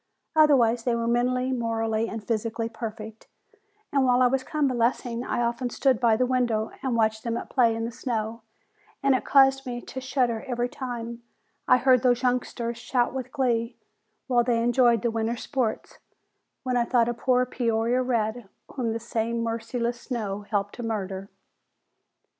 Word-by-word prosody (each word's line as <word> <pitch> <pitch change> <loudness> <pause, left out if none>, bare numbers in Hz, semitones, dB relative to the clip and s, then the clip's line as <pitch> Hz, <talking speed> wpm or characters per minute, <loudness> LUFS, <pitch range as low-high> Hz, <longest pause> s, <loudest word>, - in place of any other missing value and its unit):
Otherwise 250 -7 +4
they 240 -1 +1
were 230 0 -1
mentally, 250 +2 +1
morally 225 -2 -1
and 225 -2 -6
physically 225 +1 -2
perfect, 220 -1 -8 0.7
and 275 -1 +3
while 250 0 +4
I - - +6
was 260 +1 +1
convalescing 245 -5 0
I 240 - -1
often 240 +1 -1
stood 260 -2 +1
by 230 -2 +4
the 250 +3 +2
window 240 -4 0
and 260 -3 -1
watched 220 -1 +1
them 235 -1 -2
at - - -7
play 235 -4 +3
in 225 0 -2
the 230 - -4
snow 230 -2 -3 0.6
and 275 -1 +4
it 260 - 0
caused 270 -1 +5
me 240 -1 -3
to 260 +2 -8
shudder 255 -3 0
every 245 -1 -1
time 235 -2 -6 0.5
I 250 - +6
heard 255 -1 +4
those 245 0 +2
youngsters 240 -2 -1
shout 245 +1 0
with 260 -1 -5
glee 240 -3 0 0.5
while 245 -3 +3
they 235 -1 +1
enjoyed 240 -2 +3
the 235 - +1
winter's 225 +1 -2
sports, 255 -6 -2 0.6
when 255 -1 -1
I 240 -1 +2
thought 235 -1 +2
of 240 -1 -2
poor 250 -1 +3
Peoria 235 0 0
Red 235 -3 -1 0.2
whom 235 -4 -1
this 230 +1 -6
same 230 +1 -1
merciless 235 +1 -2
snow 210 -5 -3
helped 205 -1 -1
to - - -5
murder. 195 -4 -4
235 Hz, 170 wpm, -26 LUFS, 225-255 Hz, 0.7 s, I